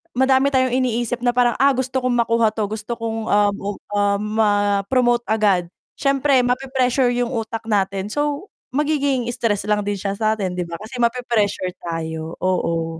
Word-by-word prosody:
madami 265 +2 +3
tayong 260 -2 +2
iniisip 245 -1 -1
na 245 - +3
parang, 240 -1 +2
"Ah, 275 +1 +6
gusto 260 0 -2
kong 255 - +1
makuha 230 -2 +2
'to, 215 -2 -2
gusto 215 +2 -6
kong, 225 -1 -3
ah, 205 0 +4
ug 205 0 -5 0.2
ah, 200 0 +2
ma-promote 210 +3 +1
agad." 195 -5 +2 0.2
Siyempre 275 -2 +2
mape-pressure 255 0 +1
'yung 245 +1 -1
utak 225 -1 -4
natin 195 -1 0
so, 295 - -2 0.3
magiging 285 -3 +1
stress 215 -4 -1
lang 210 0 +1
din 205 - 0
siya 195 +1 -3
sa 220 0 +2
atin, 190 -4 -3
'di 175 - -2
ba, 170 - -6
kasi 245 +3 -8
mape-pressure 230 -6 0
tayo 160 -1 -5
oo. 165 -3 -1
225 Hz, 165 wpm, -21 LUFS, 205-255 Hz, 0.3 s, Ah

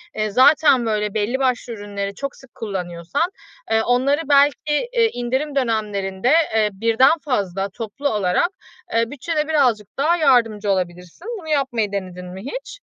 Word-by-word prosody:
eee, 215 0 -1
zaten 260 +1 +5
böyle 210 -2 -1
belli 220 +5 -1
başlı 250 -2 0
ürünleri 200 -2 -5
çok 275 +4 -5
sık 265 -3 -18
kullanıyorsan, 185 - -3 0.4
ııı, 220 0 +4
onları, 265 +5 +2
belki, 295 - +3
iii, 460 -1 +4
indirim 260 +5 -2
dönemlerinde, 210 -4 -1 0.3
eee, 220 - +4
birden 230 +9 +3
fazla 195 -7 -1
toplu 230 +7 -4
olarak, 205 - +1 0.5
ııı, 230 +1 +1
bütçede 300 +2 -2
birazcık 250 -10 +2
daha 310 +5 +3
yardımcı 230 -9 +2
olabilirsin. 180 - -4
Bunu 325 - -12
yapmayı 255 -8 0
denedin 185 -2 -5
mi 180 +1 -8
hiç? - - -7
230 Hz, 145 wpm, -21 LUFS, 200-280 Hz, 0.5 s, zaten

